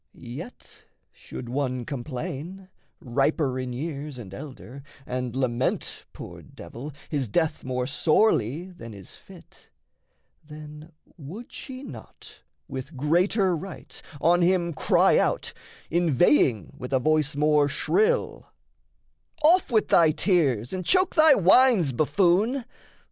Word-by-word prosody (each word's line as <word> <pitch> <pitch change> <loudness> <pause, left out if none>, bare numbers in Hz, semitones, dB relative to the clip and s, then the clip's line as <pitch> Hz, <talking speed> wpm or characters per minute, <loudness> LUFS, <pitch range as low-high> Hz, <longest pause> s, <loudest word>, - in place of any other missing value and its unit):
Yet 135 - -10 0.3
should 120 - -9
one 130 -1 -2
complain, 150 +7 -6 0.3
Riper 135 +1 0
in 130 -1 -4
years 145 +1 -5
and 100 -6 -10
elder, 135 +1 -10 0.2
and 125 -1 -4
lament, 130 -1 -2
Poor - - -10
devil, 135 +6 -10 0.2
his 140 -7 -2
death 160 +5 0
more 125 -1 -2
sorely 155 - +1
than 115 - -11
is 95 -3 -12
fit, - - -17 0.7
Then 150 +1 -11 0.3
would 180 - -10
she 260 0 -8
not, - - -12 0.3
with 135 0 -7
greater 180 - +2
right, 185 +2 -9 0.2
on 175 +4 +3
him 175 -1 +2
Cry - - +3
out, - - -1 0.4
inveighing 145 - +2
with 125 +2 -6
a 130 - +3
voice 155 +1 +1
more 150 0 +3
shrill: 435 - 0 1.0
"Off 345 +4 +4
with 220 -2 +2
thy 165 -2 +5
tears, 150 - +1
and 185 -1 -3
choke 370 - +2
thy 310 -3 +6
whines, 195 - +4
buffoon! 195 - +1
150 Hz, 120 wpm, -25 LUFS, 130-180 Hz, 1.0 s, thy